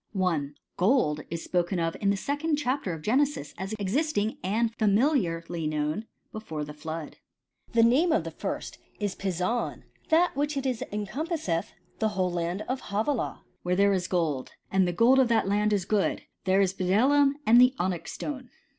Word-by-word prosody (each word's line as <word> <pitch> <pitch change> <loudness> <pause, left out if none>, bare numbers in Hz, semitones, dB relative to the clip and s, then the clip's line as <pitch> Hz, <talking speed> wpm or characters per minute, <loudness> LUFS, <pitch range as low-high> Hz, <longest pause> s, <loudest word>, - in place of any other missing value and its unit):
1. 165 -7 0 0.2
Gold 175 - +2
is 165 0 -4
spoken 180 +1 0
of 165 -1 -1
in 200 - +2
the 200 - +2
second 290 +7 -1
chapter 275 -7 -1
of 160 -2 -6
Gene^ 255 - +4
sis 280 - -4
as 190 +3 -5
existing 215 +1 0
and 220 +5 0
familiarly 195 - +1
known 155 +7 -2 0.2
before 160 -9 -5
the 150 0 -7
flood. 155 +1 -6 0.3
" - - -33
The 230 -1 +5
name 275 +9 +4
of 315 - +2
the - - -6
first - - -5 0.2
is 205 -2 -1
Pison; 190 +5 -2 0.3
that 340 +2 +4
is 290 +1 -1
it 275 - -2
which 255 -4 -1
encompasseth 210 - -2 0.3
the 220 - +2
whole 185 -3 0
land 175 +3 -2
of 255 +1 -3
Havilah, 220 +5 -1 0.2
where 180 0 0
there 200 +1 +4
is 185 -2 -1
gold. 160 -8 -1 0.2
And 190 -1 +3
the - - +1
gold 235 +9 +5
of 260 - +5
that 230 -4 +2
land 210 +1 +2
is 200 -4 +1
good: 205 -1 0 0.2
there 190 +1 +4
is 190 -1 +2
bdellium 260 +10 +3
and 235 +2 +7
the 250 +1 +5
onyx 175 -2 -2
stone." 265 -4 -6
205 Hz, 180 wpm, -27 LUFS, 175-255 Hz, 0.3 s, and